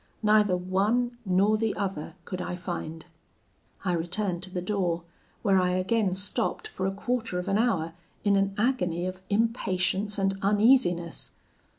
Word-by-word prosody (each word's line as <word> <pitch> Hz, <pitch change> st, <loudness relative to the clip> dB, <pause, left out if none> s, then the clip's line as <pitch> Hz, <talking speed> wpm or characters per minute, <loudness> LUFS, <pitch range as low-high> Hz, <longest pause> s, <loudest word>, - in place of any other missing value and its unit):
Neither 210 Hz, -3 st, +4 dB
one 215 Hz, +7 st, 0 dB
nor 195 Hz, +4 st, +3 dB
the 225 Hz, -1 st, 0 dB
other 190 Hz, -5 st, -3 dB
could 185 Hz, -1 st, -4 dB
I 180 Hz, -, -3 dB
find. 170 Hz, -3 st, -5 dB, 0.8 s
I 180 Hz, -, +2 dB
returned 175 Hz, +2 st, -1 dB
to 190 Hz, -, -3 dB
the 185 Hz, -, -3 dB
door, 180 Hz, -3 st, -1 dB, 0.4 s
where 195 Hz, -3 st, +4 dB
I 180 Hz, 0 st, +1 dB
again 190 Hz, +1 st, +1 dB
stopped 200 Hz, -, -1 dB
for 190 Hz, -, -3 dB
a -, -, 0 dB
quarter 230 Hz, 0 st, -2 dB
of 180 Hz, +2 st, -3 dB
an 200 Hz, +1 st, +2 dB
hour, 180 Hz, -9 st, +1 dB, 0.3 s
in 205 Hz, -1 st, +4 dB
an 195 Hz, 0 st, +1 dB
agony 180 Hz, -8 st, +1 dB
of 185 Hz, 0 st, -5 dB
impatience 205 Hz, -2 st, +1 dB
and 195 Hz, -1 st, 0 dB
uneasiness. 200 Hz, -5 st, +3 dB
195 Hz, 155 wpm, -27 LUFS, 180-210 Hz, 0.8 s, Neither